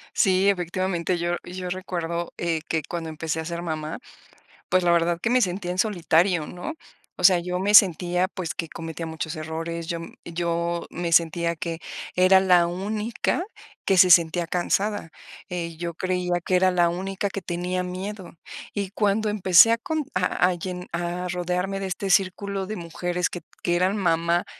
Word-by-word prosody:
Sí, 190 Hz, 0 st, +3 dB
efectivamente, 180 Hz, -1 st, 0 dB
yo 175 Hz, 0 st, -1 dB
yo 180 Hz, 0 st, -6 dB
recuerdo, 175 Hz, -2 st, -3 dB
eh, 165 Hz, -2 st, -1 dB
que 160 Hz, -2 st, 0 dB
cuando 165 Hz, -2 st, -4 dB
empecé 160 Hz, 0 st, -3 dB
a 160 Hz, -, -4 dB
ser 170 Hz, +1 st, -4 dB
mamá, 155 Hz, -2 st, -4 dB, 0.7 s
pues, 185 Hz, -, +3 dB
la 175 Hz, -, +4 dB
verdad 170 Hz, 0 st, +2 dB
que 230 Hz, -, 0 dB
me 250 Hz, +1 st, +4 dB
sentía 180 Hz, -2 st, -1 dB
en 180 Hz, -, -3 dB
solitario, 175 Hz, -4 st, +2 dB
¿no? 180 Hz, -, -6 dB, 0.4 s
O -, -, -7 dB
sea, 185 Hz, -2 st, +7 dB
yo 180 Hz, +1 st, -3 dB
me 205 Hz, +2 st, +3 dB
sentía, 180 Hz, -1 st, +5 dB
pues, 185 Hz, -4 st, -5 dB
que 165 Hz, -, -3 dB
cometía 165 Hz, +1 st, -6 dB
muchos 160 Hz, 0 st, -5 dB
errores, 165 Hz, +1 st, -4 dB
yo 170 Hz, -, -2 dB
m 165 Hz, -, -9 dB
yo 170 Hz, 0 st, -2 dB
me 170 Hz, 0 st, -4 dB
sentía 170 Hz, 0 st, +2 dB
que 165 Hz, 0 st, -4 dB, 0.4 s
era 185 Hz, +1 st, +6 dB
la 180 Hz, -2 st, +5 dB
única 210 Hz, -, -2 dB, 0.4 s
que 195 Hz, -, +3 dB
se 185 Hz, 0 st, +7 dB
sentía 170 Hz, 0 st, +5 dB
cansada, 180 Hz, 0 st, -1 dB, 0.4 s
eh, 170 Hz, -2 st, -4 dB
yo 170 Hz, 0 st, -4 dB
creía 180 Hz, 0 st, -1 dB
que 185 Hz, -, +1 dB
era 185 Hz, +1 st, +4 dB
la 175 Hz, -1 st, +3 dB
única 190 Hz, +3 st, -3 dB
que 195 Hz, -, -5 dB
tenía 180 Hz, +1 st, -2 dB
miedo. 185 Hz, +1 st, -6 dB, 0.4 s
Y 200 Hz, -2 st, -2 dB
cuando 210 Hz, +1 st, +1 dB
empecé 200 Hz, +1 st, +6 dB
a 230 Hz, -, +3 dB
cont 305 Hz, +4 st, -3 dB
a 180 Hz, 0 st, +2 dB
a 185 Hz, -, +1 dB
llen 180 Hz, +1 st, -6 dB
a 175 Hz, +1 st, -2 dB
rodearme 180 Hz, +2 st, -2 dB
de 195 Hz, -, -3 dB
este 190 Hz, +1 st, -3 dB
círculo 195 Hz, +1 st, +1 dB
de 215 Hz, +3 st, -5 dB
mujeres 175 Hz, +1 st, -2 dB
que 175 Hz, -, -7 dB
t -, -, -44 dB
que 175 Hz, -, +1 dB
eran 185 Hz, +4 st, +1 dB
mamá 170 Hz, -2 st, +1 dB
180 Hz, 180 wpm, -24 LUFS, 170-190 Hz, 0.7 s, sea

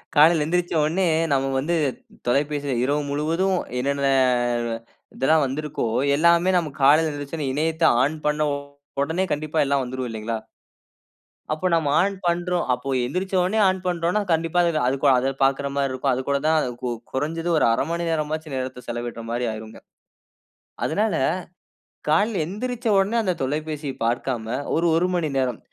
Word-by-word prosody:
காலையில 160 Hz, +2 st, +6 dB
எழுந்திரித்தவுனே 170 Hz, +1 st, +1 dB, 0.3 s
நம்ம 135 Hz, 0 st, +1 dB
வந்து 165 Hz, +6 st, 0 dB, 0.5 s
தொலைபேசியில 140 Hz, +1 st, 0 dB
இரவு 145 Hz, +3 st, +1 dB
முழுவதும் 165 Hz, +6 st, 0 dB, 0.2 s
என்னென்ன 140 Hz, +1 st, 0 dB, 1.1 s
இதெல்லாம் 155 Hz, +3 st, +3 dB
வந்திருக்கோ 140 Hz, -1 st, -3 dB, 0.3 s
எல்லாமே 170 Hz, +4 st, +4 dB
நாம் 155 Hz, -5 st, -3 dB
காலையில 155 Hz, +3 st, +5 dB
எந்திருந்தவுனே 145 Hz, 0 st, -4 dB
இணையத்த 160 Hz, +3 st, -1 dB, 0.2 s
ஆன் 150 Hz, +4 st, 0 dB
பண்ண 150 Hz, 0 st, +1 dB, 0.5 s
உடனே 160 Hz, +6 st, 0 dB
கண்டிப்பா 155 Hz, +1 st, -4 dB
எல்லாம் 140 Hz, 0 st, +1 dB
வந்துரும் 130 Hz, 0 st, -4 dB
இல்லேங்களா! 110 Hz, 0 st, -3 dB, 1.1 s
அப்போ 155 Hz, +4 st, -5 dB
நம்ம 160 Hz, -3 st, +1 dB
ஆன் 200 Hz, +2 st, 0 dB
பண்ணுறோம் 175 Hz, 0 st, 0 dB
அப்போ 125 Hz, +2 st, -4 dB, 0.2 s
எந்திரித்தவுனே 185 Hz, -, 0 dB
ஆன் 190 Hz, 0 st, +1 dB
பண்றோன்னா, 175 Hz, +3 st, 0 dB
கண்டிப்பா 165 Hz, +1 st, +1 dB
அதுல 170 Hz, -5 st, +1 dB, 0.4 s
அதுக்கு 135 Hz, +2 st, -2 dB
பார்க்கிறமாரி 140 Hz, 0 st, 0 dB
இருக்கும். 130 Hz, +1 st, 0 dB
அது 125 Hz, -, -1 dB
கூட 140 Hz, -, +3 dB
தான் 160 Hz, 0 st, +4 dB, 0.2 s
கு 125 Hz, -, -2 dB, 0.2 s
குறஞ்சது 165 Hz, +5 st, -2 dB
ஒரு -, -, +3 dB
1/2 115 Hz, -, +1 dB
மணி 170 Hz, 0 st, -2 dB
நேரமாச்சும் 155 Hz, -1 st, -2 dB
நேரத்த 130 Hz, -1 st, -5 dB
செலவிட்றமாரி 120 Hz, 0 st, -4 dB
ஆகியிருங்க. 110 Hz, 0 st, -9 dB, 1.1 s
அதனால 210 Hz, +6 st, 0 dB, 1.0 s
காலையில 200 Hz, +3 st, +2 dB
எந்திரிச்ச 240 Hz, +6 st, -5 dB
உடனே 195 Hz, +4 st, +2 dB
அந்த 190 Hz, -4 st, 0 dB
தொலைபேசிய 150 Hz, 0 st, -3 dB
பார்க்காம 120 Hz, 0 st, -1 dB, 0.3 s
ஒரு, 165 Hz, -, +1 dB
1 175 Hz, +2 st, +2 dB
மணி 165 Hz, -3 st, 0 dB
நேரம் 125 Hz, -4 st, 0 dB
150 Hz, 135 wpm, -23 LUFS, 135-170 Hz, 1.1 s, காலையில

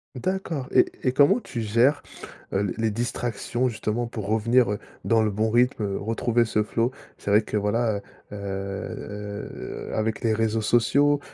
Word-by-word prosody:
D'accord 160 Hz, -2 st, -2 dB
et -, -, +6 dB, 0.2 s
et 125 Hz, -, +3 dB
comment 145 Hz, -, +4 dB
tu 120 Hz, -, -6 dB
gères, 115 Hz, +7 st, +3 dB, 0.5 s
heu, 95 Hz, -, +2 dB
l 100 Hz, -2 st, -1 dB
les 110 Hz, 0 st, +1 dB
distractions 120 Hz, +2 st, -1 dB
justement, 115 Hz, 0 st, -2 dB
pour 110 Hz, -3 st, -5 dB
revenir, 115 Hz, +2 st, +3 dB
heu, 105 Hz, -, -2 dB, 0.2 s
dans 115 Hz, -1 st, +3 dB
le 110 Hz, -, +2 dB
bon 110 Hz, +2 st, 0 dB
rythme, 120 Hz, 0 st, +2 dB
heu, 100 Hz, -1 st, -1 dB
retrouver 115 Hz, +2 st, +1 dB
ce 105 Hz, -1 st, +1 dB
flow? 115 Hz, +3 st, 0 dB, 0.3 s
C'est 100 Hz, -, -3 dB
vrai 105 Hz, +2 st, +6 dB
que, 105 Hz, -, -3 dB
voilà, 105 Hz, +2 st, +1 dB
heu -, -, -7 dB, 0.3 s
heu 100 Hz, +1 st, -5 dB, 0.4 s
heu, -, -, -6 dB
avec 110 Hz, 0 st, -1 dB
les 115 Hz, -3 st, +2 dB
réseaux 110 Hz, 0 st, +1 dB
sociaux, 140 Hz, +6 st, +3 dB
110 Hz, 175 wpm, -25 LUFS, 105-120 Hz, 0.5 s, et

